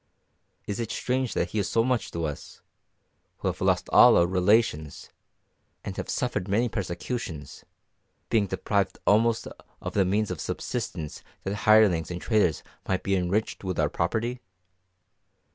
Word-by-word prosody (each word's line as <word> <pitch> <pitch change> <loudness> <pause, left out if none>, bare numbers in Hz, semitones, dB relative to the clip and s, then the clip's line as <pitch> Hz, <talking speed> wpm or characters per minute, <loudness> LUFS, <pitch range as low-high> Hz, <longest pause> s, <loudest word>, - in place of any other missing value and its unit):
Is 100 +1 -4
it 115 -2 -3
strange 130 0 -1
that - - -1
he 110 - -1
is 100 - -1
so 115 - +2
much 125 -1 0
to 85 -1 -3
us, 75 -2 -7 0.8
who - - -1
have - - -6
lost - - +2
all - - +7
our 85 - +5
relations, 90 -4 +1 0.7
and - - -5
have - - -5
suffered 90 - -1
many 110 +5 +2
persecutions, 90 - -5 0.6
being 105 -3 +2
deprived 95 +1 -1
almost 115 +2 +3 0.3
of - - -6
the 100 - +3
means 100 +2 0
of 85 -5 -4
subsistence 75 -2 -4 0.2
that 100 - -2
hirelings 105 -6 +4
and 90 0 -4
traitors 105 -6 +1 0.2
might 95 -1 -1
be 100 - +1
enriched 95 +5 -1
with 95 -3 -3
our 75 -2 +2
property? 115 +11 -2
100 Hz, 150 wpm, -26 LUFS, 90-110 Hz, 0.8 s, all